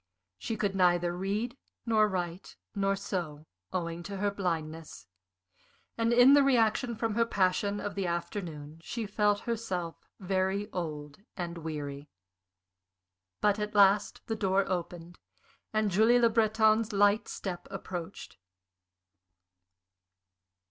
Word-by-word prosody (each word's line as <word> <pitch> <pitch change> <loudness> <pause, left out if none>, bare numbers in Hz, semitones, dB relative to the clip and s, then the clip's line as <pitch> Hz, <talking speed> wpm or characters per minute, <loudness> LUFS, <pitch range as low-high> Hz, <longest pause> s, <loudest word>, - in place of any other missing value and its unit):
She 225 - -3
could 200 -2 -1
neither 175 -2 +2
read 205 +7 -2 0.3
nor 220 -2 +4
write 180 -2 -4 0.2
nor 195 -1 +1
sew, 170 -6 -4 0.3
owing 170 -2 -3
to 200 +3 -6
her 205 +1 0
blindness, 165 - -4 0.9
and 230 0 +1
in 245 +3 +7
the 285 - +7
reaction 240 -2 +2
from 225 0 -1
her 230 +2 +3
passion 200 -1 0
of 205 - -4
the 195 -2 -2
afternoon 170 -3 -5
she 230 +6 -4
felt 205 0 +1
herself 190 -8 -3 0.2
very 190 +2 -1
old 150 -4 -5 0.2
and 170 -1 -4
weary. 145 -3 -6 1.3
But 210 0 +2
at 210 +1 -4
last 200 0 +4
the 225 - -2
door 195 -2 +1
opened 175 -1 -5 0.5
and 215 -2 +1
Julie 220 +6 +5
Le 235 -1 +4
Breton's 220 0 +3
light 205 +2 +3
step 180 -3 -6
approached. 180 - -7
195 Hz, 120 wpm, -30 LUFS, 175-215 Hz, 1.3 s, in